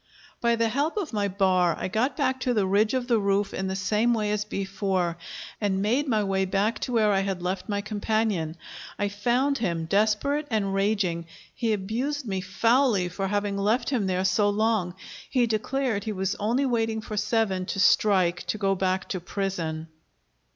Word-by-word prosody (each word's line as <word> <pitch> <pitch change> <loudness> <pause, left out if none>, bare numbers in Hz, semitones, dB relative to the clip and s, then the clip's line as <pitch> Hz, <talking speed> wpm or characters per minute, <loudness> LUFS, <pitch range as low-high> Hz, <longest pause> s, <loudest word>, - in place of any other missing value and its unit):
By 235 0 +2
the 230 0 +1
help 285 - -1
of 355 - -3
my 205 -1 +1
bar 185 -3 +2
I - - -2
got 235 +7 0
back 260 0 +1
to 250 -1 0
the 205 -3 +2
ridge 210 +5 +2
of 250 -1 -1
the 235 -3 +3
roof 200 0 +1
in 190 - -2
the 190 - -2
same 215 +5 +1
way 210 -2 -1
as 210 0 -1
before, 195 -4 -1 0.5
and 195 -2 +1
made 255 +8 +1
my 220 -5 +2
way 195 -1 0
back 200 +4 0
to - - -3
where 220 -3 +3
I 195 - +3
had 195 -2 -2
left 185 +4 -3
my 205 -1 0
companion. 210 -5 -1 0.4
I 205 0 0
found 245 +7 +1
him 170 -7 -1
desperate 215 - +1
and 205 -4 0
raging; 195 -4 0 0.3
he 230 -2 -1
abused 240 +8 -2
me 190 -2 -2
foully 215 0 +2
for 195 +2 -3
having 205 0 -1
left 230 +6 +1
him 225 -8 0
there 185 0 0
so 200 +2 +3
long. 205 -4 0 0.3
He 250 -3 +3
declared 225 -1 -1
he 215 - -2
was 190 0 -1
only 235 +7 +1
waiting 225 -3 0
for 215 - -6
seven 205 -3 0
to 195 - -3
strike 185 -4 +3
to - - -1
go 195 -1 +1
back 190 0 -1
to 185 - -2
prison. 170 -4 -3
205 Hz, 190 wpm, -26 LUFS, 190-230 Hz, 0.5 s, the